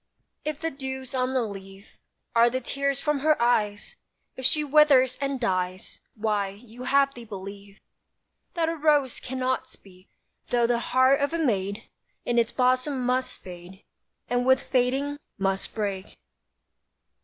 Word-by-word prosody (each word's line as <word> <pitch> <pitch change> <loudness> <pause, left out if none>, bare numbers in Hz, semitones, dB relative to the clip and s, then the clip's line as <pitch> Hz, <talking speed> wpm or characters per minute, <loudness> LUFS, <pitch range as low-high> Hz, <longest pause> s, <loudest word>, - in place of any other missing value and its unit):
If 305 -1 -3
the 325 0 -2
dews 265 -1 -6
on 255 0 0
the 255 - +2
leaf 195 -1 -9 0.4
Are 235 +1 +6
the 255 +2 -2
tears 275 +2 -1
from 295 -1 0
her 305 +2 +3
eyes; 210 -4 0 0.4
If 260 - -5
she 300 +3 +3
withers 280 -3 +5
and 275 -1 -1
dies, 185 -3 -2
Why, 210 -2 0
you 225 +5 -11
have 275 +1 +3
the 240 - -10
belief, 200 -1 -9 0.8
That 330 -2 +1
a 330 - -1
rose 295 -4 +2
cannot 260 0 -2
speak, 185 -1 -16 0.4
Though 240 -1 +3
the 235 0 +2
heart 260 +3 +3
of 285 +3 0
a - - +1
maid 200 - -1 0.4
In 240 0 +2
its 230 0 +1
bosom 255 +1 +1
must 255 +1 -1
fade, 180 +1 -11 0.4
And 245 0 +1
with 260 +1 +4
fading 270 +3 0 0.2
must 195 0 -1
break. 200 -3 -4
250 Hz, 150 wpm, -26 LUFS, 205-275 Hz, 0.8 s, Are